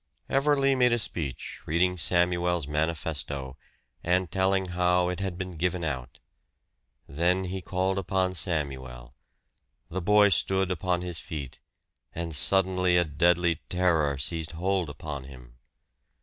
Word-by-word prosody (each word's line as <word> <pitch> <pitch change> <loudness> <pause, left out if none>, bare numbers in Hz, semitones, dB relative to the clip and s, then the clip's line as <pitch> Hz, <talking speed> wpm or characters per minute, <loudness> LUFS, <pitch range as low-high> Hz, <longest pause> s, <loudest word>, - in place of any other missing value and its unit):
Everley 135 0 +3
made 125 -2 +3
a - - +3
speech, 75 - -3
reading 90 +3 +2
Samuel's 85 -1 +1
manifesto, 75 -3 -2 0.5
and 90 -1 +1
telling 95 0 +1
how 90 0 +2
it 90 - -4
had 95 -3 -3
been 90 -3 -6
given 90 +1 -1
out. 65 -6 -4 0.9
Then 90 +5 +1
he 95 +1 -4
called 95 +2 -1
upon 95 0 0
Samuel. 65 -8 -2 0.8
The 95 +2 -3
boy 105 +3 +5
stood 95 +1 +1
upon 90 0 -1
his 90 -2 -4
feet 75 -8 -7 0.6
and 85 -1 -4
suddenly 90 +2 +3
a 85 - +4
deadly 85 +2 +2
terror 80 -6 +1
seized 80 +3 -1
hold 90 0 -1
upon 70 -2 -7
him. 60 -3 -14
90 Hz, 130 wpm, -27 LUFS, 75-95 Hz, 0.9 s, boy